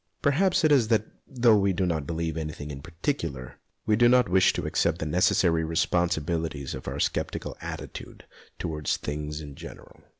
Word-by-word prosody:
Perhaps 175 +6 +3
it 155 - +4
is 130 -6 +5
that, 110 -2 +2 0.2
though 120 -4 +4
we 100 -1 +2
do 90 +1 0
not 80 -5 -1
believe 80 -1 -2
in 80 - -2
anything 75 -1 -7
in 70 -1 -7
particular, 80 - -4 0.3
we 105 - +3
do 120 +2 +5
not 125 0 +5
wish 95 0 +5
to - - -3
accept - - +1
the - - -4
necessary 85 0 +2
responsibilities 80 -3 -1
of 65 - -8
our - - -4
sceptical - - -2
attitude - - -8 0.3
towards 75 -2 -2
things 75 +1 -5
in 75 -2 -9
general. - - -12
85 Hz, 175 wpm, -27 LUFS, 75-105 Hz, 0.3 s, is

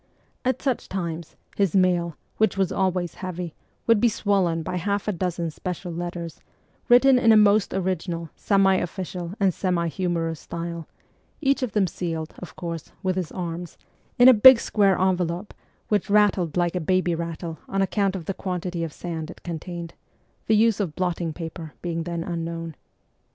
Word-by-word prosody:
At 255 +1 -1
such 265 -4 -1
times, 170 -3 -4 0.2
his 195 -4 +1
mail, 175 -3 +2 0.2
which 220 -2 +2
was 190 -2 +1
always 185 -2 0
heavy, 180 -3 -4 0.3
would 230 -2 +4
be 235 - +4
swollen 190 -6 +1
by 180 +2 -3
half 200 +4 -1
a - - +2
dozen 175 -2 -2
special 180 +2 -5
letters, 170 -1 -5 0.5
written 250 +1 +7
in 225 -2 +5
a 220 - +7
most 210 -1 +4
original, 175 -3 -2
semi 195 -2 +3
official, 180 0 -4
and 195 -3 +3
semi 175 -2 0
humorous 165 -1 -2
style; 170 -1 -6 0.5
each 275 -2 +2
of 250 -6 -2
them 210 -3 +3
sealed, 165 -2 -4
of 180 - -10
course, 170 -3 -6
with 185 -1 +1
his 185 -4 -3
arms, 175 -1 -5 0.4
in 245 - +8
a 260 - +10
big 245 +2 +9
square 200 -5 +2
envelope, 180 0 0 0.4
which 210 0 +1
rattled 200 -6 +3
like 175 0 +1
a - - +1
baby 185 +1 +1
rattle 165 -1 -5
on 195 0 +1
account 195 0 0
of 175 -4 -5
the 195 - -2
quantity 180 -2 -3
of 165 - -3
sand 165 -2 -5
it - - -12
contained 170 0 -6 0.5
the 220 - +4
use 220 0 +4
of 180 -7 -2
blotting 175 -2 -1
paper 160 -1 -7
being 170 -1 -2
then 170 -1 -3
unknown. 165 -1 -4
180 Hz, 170 wpm, -24 LUFS, 170-195 Hz, 0.5 s, a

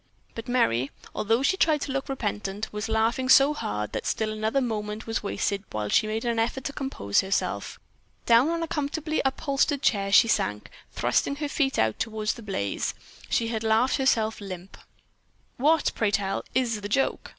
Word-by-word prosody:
But 230 - -7
Merry, 135 - +2 0.2
although 225 +5 +1
she 380 +7 +2
tried 310 -5 +3
to 280 - -3
look 275 +1 -3
repentant, 210 -4 -3
was 210 +1 -4
laughing 225 +4 +1
so 275 +2 +7
hard 105 - -3
that - - -4
still 220 -1 -1
another 220 +5 0
moment 215 -3 -3
was 225 - -2
wasted 200 0 -2
while 105 -1 -3
she 215 - +3
made 220 +2 -3
an 235 -1 0
effort 240 +3 -1
to 280 - -4
compose 265 - 0
herself. 190 +1 -2 0.5
Down 235 +5 +5
on 335 0 -1
a - - -3
comfortably 305 +1 -2
upholstered 280 +1 0
chair 195 -3 +1
she 220 - +7
sank, 105 - -1 0.2
thrusting 125 - 0
her 295 +1 -3
feet 280 -2 0
out 110 -1 +1
toward 220 -1 -2
the 235 - -1
blaze. 145 - -2 0.3
She 230 -1 +1
had 225 -1 -2
laughed 225 +5 +3
herself 220 -6 +1
limp. 185 -1 -8 0.8
"What, 305 +4 +3
pray 220 - +1
tell, 195 -1 -1
is 235 -5 +1
the 205 - -5
joke? 270 +6 0
225 Hz, 180 wpm, -26 LUFS, 205-270 Hz, 0.8 s, so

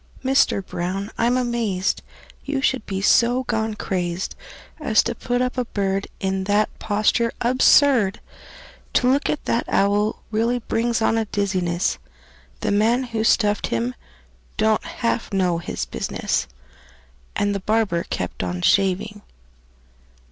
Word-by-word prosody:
Mister 265 -6 +2
Brown, 185 +3 -4
I'm 240 +2 +2
amazed 230 -7 -1 0.4
You 280 -1 -2
should 260 -3 0
be 195 -1 -3
so 245 +4 +4
gone 220 -3 -1
crazed 180 -2 -3 0.4
As 255 -8 +3
to 235 - -2
put 245 +1 -1
up 250 0 -2
a 250 - 0
bird 195 -2 -1
In 190 0 -1
that 205 +2 +2
posture 215 +2 +1
absurd! 250 -3 +4 0.7
To 250 - +3
look 280 +2 +1
at 300 - -2
that 230 - 0
owl 205 +2 +1
really 230 +3 +1
brings 230 -1 -1
on 225 0 +2
a 220 - -1
dizziness; 185 - -1 0.6
The - - 0
man 225 +5 +2
who 230 -3 -2
stuffed 210 -2 +2
him 115 +2 -1 0.6
don't 220 0 +2
half 230 -1 -2
know 180 -4 +1
his - - -4
business!" 65 -1 -2 0.9
And 205 0 +1
the 200 - -2
barber 210 -3 +1
kept 90 - -3
on 90 -1 -3
shaving. 195 +2 +1
215 Hz, 135 wpm, -22 LUFS, 190-235 Hz, 0.9 s, so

